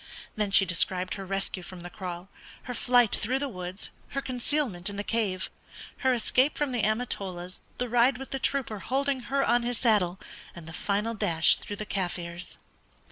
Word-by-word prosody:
Then 210 -1 0
she 195 0 +6
described 185 +1 +1
her 195 -1 -6
rescue 195 -1 -2
from 180 0 -9
the 175 - -7
kraal, 180 -1 -6 0.4
her 250 - -5
flight 245 -2 +4
through 250 +4 0
the 280 +1 -1
woods, 185 -4 -5 0.3
her - - +4
concealment 250 -7 0
in 200 - -6
the 205 - -3
cave, 205 -5 -1 0.5
her 260 - +2
escape 255 +3 +2
from 290 -3 0
the 245 -2 0
Amatolas, 195 -5 -1 0.2
the 250 - -1
ride 245 +2 +4
with 270 +1 -8
the 270 - -1
trooper 255 -6 -1
holding 275 +4 0
her 275 0 +2
on 240 +1 +4
his 240 0 -2
saddle, 195 -7 +2 0.4
and 170 -2 -9
the 165 - -8
final 205 +5 0
dash 165 -6 +5
through 205 - -6
the 210 - -5
Kaffirs. 175 -3 -4
210 Hz, 185 wpm, -28 LUFS, 185-250 Hz, 0.5 s, she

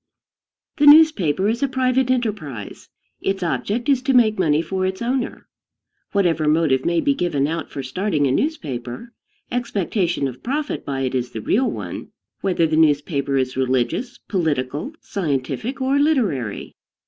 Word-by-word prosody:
The 295 -1 +4
newspaper 255 - +6
is 230 +2 0
a 280 - +2
private 260 -1 +1
enterprise. 205 - -3 0.3
Its 195 -1 -1
object 210 +7 -2
is 275 -3 +3
to 265 0 +1
make 220 -4 +4
money 155 -4 +3
for 185 +3 -2
its 190 0 -1
owner. 245 +1 -2 0.6
Whatever 170 -6 +1
motive 150 -4 +2
may 170 0 +2
be 280 - +2
given 170 - 0
out 165 +3 -3
for 140 - -6
starting 150 +3 0
a 135 - +2
newspaper, 145 - -3 0.4
expectation 195 - -1
of 125 -1 -8
profit 290 +4 -3
by 135 -1 -3
it 130 -1 -1
is 125 -1 -1
the 110 - -4
real 250 - +1
one, - - -6 0.3
whether 180 -4 +1
the 155 -1 0
newspaper 145 -2 +2
is 130 -1 -1
religious, 130 - -1
political, 150 - -2
scientific, 185 - -3
or 270 +2 +1
literary. 210 - 0
180 Hz, 150 wpm, -21 LUFS, -, 0.6 s, newspaper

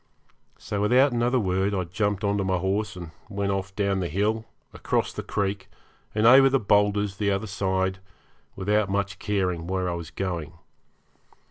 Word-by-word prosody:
So 105 -1 -4
without 125 +6 +4
another 120 +2 +1
word 95 0 0
I 95 - 0
jumped 100 +3 -2
on 100 0 +1
to - - 0
my 95 -1 +1
horse 100 +4 -1
and 85 -3 -8 0.2
went 100 -1 -1
off 95 0 -3
down 100 -2 0
the 90 - -1
hill, 105 +7 0 0.3
across - - -1
the - - -4
creek, 100 -1 -3 0.5
and 110 +1 +2
over 135 +3 +8
the 135 0 +2
boulders 105 -1 +2
the 105 -1 0
other 100 +2 0
side, 95 -2 -1 0.6
without 105 +1 +1
much 100 0 -2
caring 90 -5 -1
where 95 0 -1
I 90 - -1
was 85 -2 -6
going. 85 -2 -4
100 Hz, 170 wpm, -25 LUFS, 95-105 Hz, 0.6 s, over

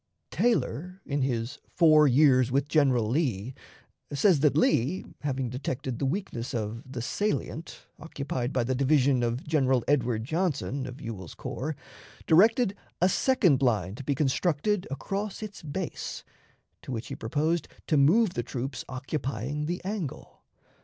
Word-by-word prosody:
Taylor, 185 -6 0
in 140 0 -1
his 130 +1 -2
"Four 155 -3 +5
Years 130 -2 +5
with 140 +2 +1
General 135 -8 +3
Lee," 125 - -1 0.6
says 145 +3 +4
that 145 0 +3
Lee, 155 +3 +2
having 135 -3 -2
detected 125 0 -4
the 135 - 0
weakness 135 - -3
of 110 0 -3
"the 120 -4 -4
salient" 205 - -3
occupied 140 -5 -4
by 125 - +1
the 130 +2 0
division 135 -1 +3
of 120 +2 -1
General 135 -5 +2
Edward 120 -6 +1
Johnson, 145 -2 -1
of 125 +2 -8
Ewell's 105 - -7
corps, 150 +4 -4 0.5
directed 205 +5 +4 0.2
a 180 - +4
second 190 - +3
line 105 -8 +1
to 125 - -8
be 140 +1 0
constructed 165 +7 0
across 200 +9 -4
its 210 -1 -8
base, 160 +3 -5 0.6
to - - -8
which 115 -2 -4
he - - -4
proposed 155 +8 -1 0.2
to 155 - +1
move 175 +10 +5
the - - -1
troops 125 +1 -5
occupying 135 +1 -3
the 175 +1 -3
angle. 190 -9 -5
140 Hz, 145 wpm, -28 LUFS, 125-160 Hz, 0.6 s, Four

